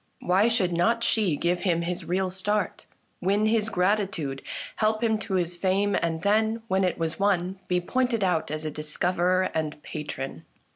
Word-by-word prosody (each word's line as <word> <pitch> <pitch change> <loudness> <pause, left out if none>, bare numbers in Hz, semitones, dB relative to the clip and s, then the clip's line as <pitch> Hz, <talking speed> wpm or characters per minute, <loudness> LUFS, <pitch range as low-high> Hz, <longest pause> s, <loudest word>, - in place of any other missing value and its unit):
Why 190 +5 +3
should 210 -7 +1
not 230 +8 +2
she 205 -10 +2
give 175 +4 0
him 170 -3 +1
his 175 +1 -2
real 185 +1 0
start, 200 +2 -1 0.3
win 200 +3 +2
his 220 0 +2
gratitude, 185 -8 0 0.4
help 215 +1 +1
him 220 -2 +2
to 205 -3 -3
his 175 -1 0
fame, 195 +3 +1
and 165 -1 -1
then, 220 +2 +2
when 190 -2 +2
it 180 - 0
was 165 +1 -2
won, 190 -1 +1
be 180 -1 +2
pointed 240 +3 0
out 180 -4 +1
as 155 +1 -4
a 155 - -2
discoverer 180 +5 0
and 155 -1 -1
a - - -23
patron 145 - -6
185 Hz, 180 wpm, -26 LUFS, 170-210 Hz, 0.4 s, Why